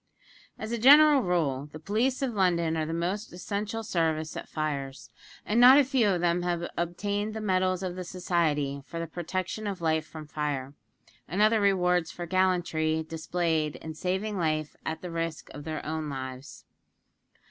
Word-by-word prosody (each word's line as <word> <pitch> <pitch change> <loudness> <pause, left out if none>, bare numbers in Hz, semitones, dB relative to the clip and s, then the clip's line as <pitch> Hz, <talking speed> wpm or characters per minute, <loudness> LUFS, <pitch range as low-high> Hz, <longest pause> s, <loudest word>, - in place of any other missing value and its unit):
As 220 +1 -6
a 235 - -1
general 290 +3 +8
rule, 150 - 0
the - - -8
police 230 - 0
of 255 -3 -1
London 170 -5 +2
are 160 - 0
of 155 - -2
the - - -3
most 185 +6 -2
essential 205 +5 -4
service 160 -5 -1
at - - -7
fires; 140 -3 -4 0.3
and 220 +3 +1
not 255 +3 +10
a 290 - +7
few 255 -5 +2
of 180 -3 +1
them 175 0 +2
have 175 -1 -1
obtained 205 +5 -2
the - - -3
medals 185 -2 +1
of 180 -1 -3
the 185 - -5
Society 160 -6 -1
for 165 - -6
the 165 - -2
protection 185 +5 -4
of 195 -2 -3
life 160 -1 0
from 155 -1 -9
fire, 145 -3 -3 0.5
and 180 +6 -3
other 215 +1 +4
rewards 180 -4 +2
for 175 - -6
gallantry 170 -3 +1
displayed 160 -1 -1
in 160 - -7
saving 190 +5 -2
life 155 -2 -1
at 160 +1 -4
the 180 - -5
risk 165 -1 -4
of 145 - -9
their 155 -2 -4
own 155 0 -3
lives. 130 0 -7
175 Hz, 180 wpm, -28 LUFS, 155-200 Hz, 0.5 s, not